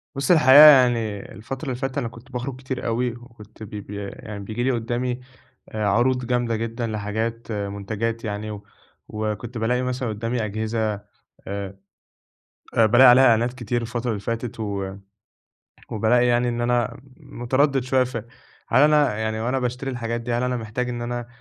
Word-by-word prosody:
بُص 140 Hz, +2 st, 0 dB
الحقيقة 145 Hz, -5 st, +8 dB
يعني 120 Hz, -8 st, +5 dB
الفترة 130 Hz, +8 st, -7 dB
اللي 130 Hz, -3 st, -2 dB
فاتت 135 Hz, +2 st, -4 dB
أنا 120 Hz, -4 st, -1 dB
كنت 115 Hz, +3 st, -13 dB
باخرج 125 Hz, +1 st, -4 dB
كتير 130 Hz, 0 st, -5 dB
أوي، 120 Hz, +2 st, 0 dB
وكنت 115 Hz, -2 st, -13 dB
ب 105 Hz, -, -9 dB
ب 105 Hz, -1 st, -8 dB
يعني 100 Hz, 0 st, -7 dB
بييجي 110 Hz, +4 st, -3 dB
لي 130 Hz, -, +2 dB
قدّامي 120 Hz, +1 st, -2 dB, 0.5 s
آآ 110 Hz, -1 st, -3 dB
عروض 125 Hz, +4 st, +2 dB
جامدة 120 Hz, -1 st, 0 dB
جدًا 115 Hz, +1 st, -3 dB
لحاجات 110 Hz, +2 st, -3 dB
منتجات 105 Hz, +2 st, -3 dB
يعني، 105 Hz, 0 st, -4 dB, 0.5 s
وكنت 110 Hz, +3 st, -4 dB
بالاقي 120 Hz, +3 st, 0 dB
مثلًا 125 Hz, -1 st, -2 dB
قدّامي 115 Hz, +2 st, -2 dB
أجهزة 110 Hz, +1 st, -1 dB, 0.5 s
آآ 100 Hz, -1 st, -5 dB, 1.0 s
آآ، 115 Hz, -, +5 dB
بالاقي 120 Hz, +4 st, +7 dB
عليها 125 Hz, +2 st, +7 dB
إعلانات 120 Hz, 0 st, +3 dB
كتير 120 Hz, -1 st, -2 dB
الفترة 120 Hz, +1 st, -3 dB
اللي 105 Hz, -, -3 dB
فاتت، 115 Hz, +3 st, -4 dB
و 100 Hz, -3 st, -3 dB, 1.0 s
وبالاقي 115 Hz, +3 st, +3 dB
يعني 120 Hz, 0 st, +2 dB
إن 120 Hz, 0 st, -2 dB
أنا 120 Hz, -1 st, 0 dB, 0.2 s
متردد 130 Hz, +2 st, 0 dB
شوية 130 Hz, 0 st, +2 dB
ف 125 Hz, -1 st, -5 dB, 0.5 s
هل 130 Hz, +4 st, +4 dB
أنا 150 Hz, -7 st, +4 dB
يعني 110 Hz, 0 st, -2 dB
وأنا 125 Hz, +4 st, 0 dB
باشتري 125 Hz, +2 st, -3 dB
الحاجات 120 Hz, -1 st, -3 dB
دي 120 Hz, 0 st, -3 dB
هل 120 Hz, +1 st, 0 dB
أنا 125 Hz, 0 st, 0 dB
محتاج 115 Hz, +2 st, -3 dB
إن 120 Hz, -1 st, -4 dB
أنا 120 Hz, 0 st, -4 dB
120 Hz, 165 wpm, -23 LUFS, 110-125 Hz, 1.0 s, الحقيقة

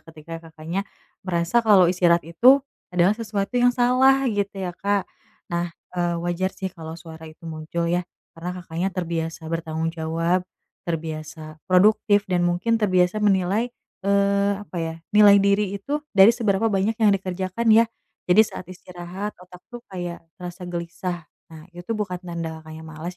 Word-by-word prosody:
ketika 165 Hz, +1 st, -10 dB
Kakaknya 160 Hz, +4 st, -4 dB, 0.4 s
merasa 175 Hz, +4 st, +1 dB
kalau 205 Hz, -5 st, +6 dB
istirahat 175 Hz, -2 st, +3 dB
itu 250 Hz, -, +5 dB, 0.3 s
adalah 180 Hz, +2 st, +3 dB
sesuatu 210 Hz, -2 st, -3 dB
yang 245 Hz, -, +6 dB
salah 260 Hz, +2 st, +4 dB
gitu 200 Hz, -1 st, -2 dB
ya 180 Hz, -, -3 dB
Kak. 200 Hz, +1 st, 0 dB, 0.5 s
Nah, 170 Hz, 0 st, 0 dB, 0.2 s
e 180 Hz, -, -3 dB, 0.2 s
wajar 175 Hz, +2 st, 0 dB
sih, 190 Hz, -2 st, -4 dB
kalau 160 Hz, -2 st, -8 dB
suara 160 Hz, -1 st, -11 dB
itu 155 Hz, +2 st, -16 dB
muncul 160 Hz, +1 st, -4 dB
ya, 175 Hz, +1 st, +1 dB, 0.3 s
karena 175 Hz, +1 st, -6 dB
Kakaknya 175 Hz, +2 st, -2 dB
terbiasa 165 Hz, -2 st, -3 dB
bertanggung 165 Hz, 0 st, -2 dB
jawab, 165 Hz, +2 st, 0 dB, 0.5 s
terbiasa 155 Hz, -1 st, -5 dB
produktif 205 Hz, +2 st, +4 dB
dan 180 Hz, -2 st, 0 dB
mungkin 225 Hz, +7 st, +1 dB
terbiasa 185 Hz, 0 st, +2 dB
menilai, 200 Hz, +3 st, +2 dB, 0.4 s
eee, 200 Hz, 0 st, +3 dB
apa 185 Hz, -, -11 dB
ya, 165 Hz, 0 st, -3 dB, 0.2 s
nilai 210 Hz, -1 st, +8 dB
diri 200 Hz, 0 st, +2 dB
itu 285 Hz, +10 st, -3 dB, 0.2 s
dari 195 Hz, +4 st, +8 dB
seberapa 220 Hz, -3 st, 0 dB
banyak 200 Hz, +3 st, +1 dB
yang 220 Hz, -3 st, +4 dB
dikerjakan 190 Hz, +3 st, -2 dB
ya. 230 Hz, +1 st, +7 dB, 0.4 s
Jadi 180 Hz, +4 st, +5 dB
saat -, -, -8 dB
istirahat 180 Hz, +3 st, -7 dB
otak 180 Hz, 0 st, -15 dB
tuh, 240 Hz, -1 st, -9 dB
kayak 175 Hz, -2 st, -5 dB, 0.2 s
terasa 180 Hz, +1 st, -7 dB
gelisah. 175 Hz, -1 st, -5 dB, 0.2 s
Nah, 155 Hz, -1 st, -11 dB
itu 175 Hz, +6 st, -5 dB
bukan 195 Hz, -4 st, -3 dB
tanda 165 Hz, -2 st, -5 dB
Kakaknya 160 Hz, 0 st, -10 dB
malas 160 Hz, +3 st, -7 dB
180 Hz, 155 wpm, -23 LUFS, 165-200 Hz, 0.5 s, nilai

